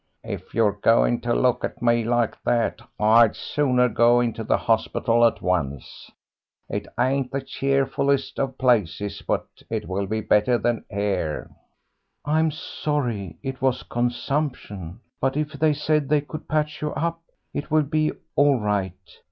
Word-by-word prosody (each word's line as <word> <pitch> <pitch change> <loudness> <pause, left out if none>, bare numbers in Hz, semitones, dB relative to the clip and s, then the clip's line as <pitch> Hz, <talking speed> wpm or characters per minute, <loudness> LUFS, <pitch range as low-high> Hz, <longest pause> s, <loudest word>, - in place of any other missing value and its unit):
"If - - -7
you're 110 -2 +4
going - - +3
to - - 0
look - - +2
at - - -4
me 120 -1 +2
like 120 0 +1
that 115 -1 0 0.2
I'd 110 +1 +5
sooner 125 -4 +1
go 120 +1 +4
into 115 -2 -1
the - - +2
hospital 115 +1 +1
at 115 - +2
once. 75 -7 -2 0.6
It - - -4
ain't 130 0 +1
the 135 - -1
cheerfulest 135 0 0
of 135 -1 -2
places, 105 -5 +1
but - - -1 0.2
it 110 -2 -3
will 95 +1 -2
be 110 +2 -1
better 105 +4 +3
than 120 -1 -1
here." 100 -7 -2 0.7
"I'm 155 +2 +2
sorry 145 - -3
it 135 -1 -5
was 130 -1 +1
consumption. 120 - -3 0.2
But 135 +2 0
if 150 0 -1
they 155 +1 +2
said 150 -1 0
they 150 -1 +3
could 150 +2 -9
patch 150 -1 -1
you 150 0 -2
up, 165 0 -2 0.3
it 145 - -4
will 155 0 +3
be 155 +1 0 0.2
all 140 -2 +4
right. 100 -4 -1
120 Hz, 150 wpm, -24 LUFS, 105-145 Hz, 0.7 s, I'd